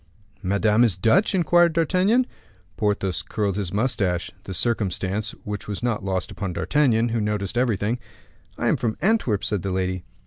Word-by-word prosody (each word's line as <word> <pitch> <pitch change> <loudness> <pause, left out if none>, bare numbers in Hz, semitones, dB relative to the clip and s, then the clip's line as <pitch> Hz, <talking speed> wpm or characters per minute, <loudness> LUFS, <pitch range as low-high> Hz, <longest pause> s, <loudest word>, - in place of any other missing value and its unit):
"Madame 105 +4 +3
is 105 -8 +2
Dutch?" 180 - +3
inquired 175 -1 +4
D'Artagnan. 185 - +3 0.5
Porthos 100 -4 0
curled 100 -3 -2
his 100 -4 -2
mustache, 100 -6 0 0.2
a 95 - -4
circumstance 100 0 -1
which 105 0 -5
was 105 +2 -4
not 115 -5 -1
lost 95 -2 -2
upon 95 -3 -4
D'Artagnan, 120 -1 +2
who 115 -1 0
noticed 105 -1 -1
everything. 120 -1 0 0.6
"I - - -2
am - - +3
from 115 -2 -2
Antwerp," 190 - +1
said 105 -4 -1
the 100 - -3
lady. 95 -1 -1
105 Hz, 160 wpm, -24 LUFS, 95-120 Hz, 0.6 s, inquired